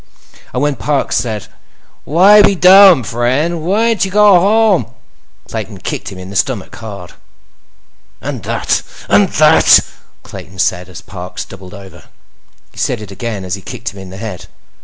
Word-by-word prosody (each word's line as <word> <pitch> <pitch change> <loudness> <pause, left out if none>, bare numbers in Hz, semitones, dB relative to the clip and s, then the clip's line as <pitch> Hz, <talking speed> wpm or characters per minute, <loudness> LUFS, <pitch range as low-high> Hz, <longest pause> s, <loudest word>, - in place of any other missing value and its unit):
And 125 - -2
when 145 -1 -1
Parks 145 -2 -1
said: 110 -4 -2 0.6
"Why 195 +7 +6
be 200 -1 +3
dumb, 185 -5 +7
friend? 130 +9 -1
Whyn't 220 +5 +1
you 190 - -2
go 205 -1 +5
home?" 205 - +2 0.6
Clayton - - -6
kicked - - -5
him 95 - -10
in 95 +1 -10
the - - -10
stomach, - - -2
hard. 100 -5 -9 1.1
"And - - -6
that, - - -1 0.3
that—" - - +5 0.4
Clayton 95 +3 -11
said 90 -1 -1
as 90 - -11
Parks 90 -1 -8
doubled 95 0 -12
over. 100 -1 -13 0.7
He - - -13
said 125 - -1
it 105 -2 -10
again 100 -1 -5
as 90 - -4
he 100 - -5
kicked 120 +3 -7
him 100 - -12
in 95 -1 -10
the 95 - -10
head. 100 -4 -8
120 Hz, 160 wpm, -14 LUFS, -, 1.1 s, dumb